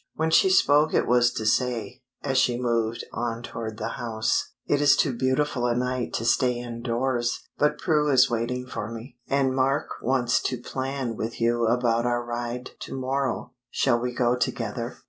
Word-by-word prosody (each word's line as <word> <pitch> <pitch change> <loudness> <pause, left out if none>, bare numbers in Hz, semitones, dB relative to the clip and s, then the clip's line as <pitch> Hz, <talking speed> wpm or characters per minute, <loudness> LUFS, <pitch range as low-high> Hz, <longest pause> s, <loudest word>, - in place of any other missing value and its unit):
When 160 0 0
she 190 - +5
spoke 150 -4 +4
it - - +3
was 120 0 +4
to 110 - -4
say, 115 -2 0 0.2
as 135 -2 +1
she 125 -1 +2
moved 115 -2 -1
on 120 0 -3
toward 110 -2 -6
the 110 - -3
house 110 -2 -1
"It 145 0 +1
is 145 -1 +6
too 135 -5 +1
beautiful 130 0 0
a 120 - +1
night 125 0 -1
to 115 - -2
stay 125 +1 +2
in 120 -1 -6
doors, 120 0 -1
but 150 - +2
Prue 150 -3 +1
is 130 -3 +5
waiting 120 +2 -2
for 115 -4 -5
me, 115 +2 -9
and 135 -1 +1
Mark 135 +2 0
wants 120 -2 +1
to 125 - -2
plan 130 -1 -4
with 115 +1 -4
you 120 0 +2
about 120 0 +2
our 120 0 0
ride 120 +1 -4
to 135 - -6
morrow. 130 0 -2 0.2
Shall 120 -3 +2
we 125 +1 -2
go 125 0 +1
together?" 125 - -3
125 Hz, 185 wpm, -25 LUFS, 120-130 Hz, 0.2 s, is